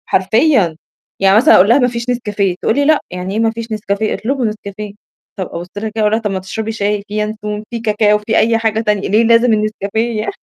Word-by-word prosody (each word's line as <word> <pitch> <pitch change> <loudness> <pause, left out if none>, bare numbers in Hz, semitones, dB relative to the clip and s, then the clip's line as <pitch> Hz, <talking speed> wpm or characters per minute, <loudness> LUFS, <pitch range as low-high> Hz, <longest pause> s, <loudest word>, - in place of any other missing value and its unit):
حرفيًا، 205 - +2 0.4
يعني 195 +1 +4
مثلًا 295 +9 +6
أقول 190 +3 +5
لها: 235 - +6
"ما 250 - +3
فيش 235 0 -4
نسكافيه." 210 -6 -1
تقول 220 - +1
لي: 285 - +1
"لأ، 310 0 +4
يعني 180 +1 -5
إيه 215 - -1
ما 225 0 +2
فيش 230 0 -7
نسكافيه؟ 210 0 -2
اطلبوا 260 +2 -2
نسكافيه." 210 -1 -6 0.5
طَب 185 - -2
أبُص 170 +1 -6
لها 220 +2 -3
كده - - -16
وأقول 210 - +2
لها: 220 +1 +1
"طَب 210 -2 -2
ما 190 - -2
تشربي 220 +4 -5
شاي، 210 -1 -1
في 210 +1 -3
ينسون، 210 0 -4
في 235 - -4
كاكاو، 210 -1 +2
في 220 +1 -1
أي 230 0 +3
حاجة 220 -1 0
تانية، 210 -3 -1
ليه 215 +4 +3
لازم 230 +1 +4
النسكافيه 215 +1 -1
يع" 215 - -3
215 Hz, 230 wpm, -16 LUFS, 205-230 Hz, 0.5 s, مثلًا